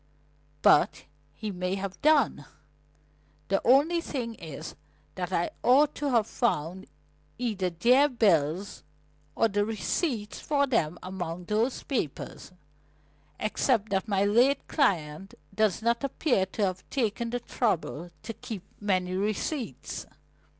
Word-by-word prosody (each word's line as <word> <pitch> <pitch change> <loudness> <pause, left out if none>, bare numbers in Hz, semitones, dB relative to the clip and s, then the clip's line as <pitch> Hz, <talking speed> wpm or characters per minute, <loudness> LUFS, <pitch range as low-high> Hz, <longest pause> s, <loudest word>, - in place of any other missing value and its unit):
But - - +5 0.3
he 210 +7 -4
may 180 0 -2
have 195 -1 -5
done. 285 - +3 1.0
The 195 - +2
only 290 +7 +4
thing 245 -8 -4
is 160 -6 -8 0.4
that 180 -1 -4
I 175 -2 0
ought 280 +4 +5
to 290 -1 -2
have 230 -5 +3
found 185 - -1 0.5
either 210 -7 -1
their 250 - +4
bills 190 - +1 0.5
or 225 - +3
the 205 -1 +1
receipts 220 - -2
for 285 -2 +1
them 175 - 0
among 180 -2 -5
those 220 +6 0
papers 185 - -4 0.9
except 220 0 +1
that 195 +1 0
my 200 -1 +2
late 245 +7 +3
client 190 - 0 0.2
does 215 0 +1
not 235 +3 +1
appear 260 -7 +1
to 205 +2 -1
have 185 -1 -4
taken 235 -2 -1
the 245 +1 -2
trouble 175 - -1
to 225 - -5
keep 210 -4 -7 0.2
many 185 -3 0
receipts." 210 - -3
210 Hz, 125 wpm, -28 LUFS, 185-245 Hz, 1.0 s, But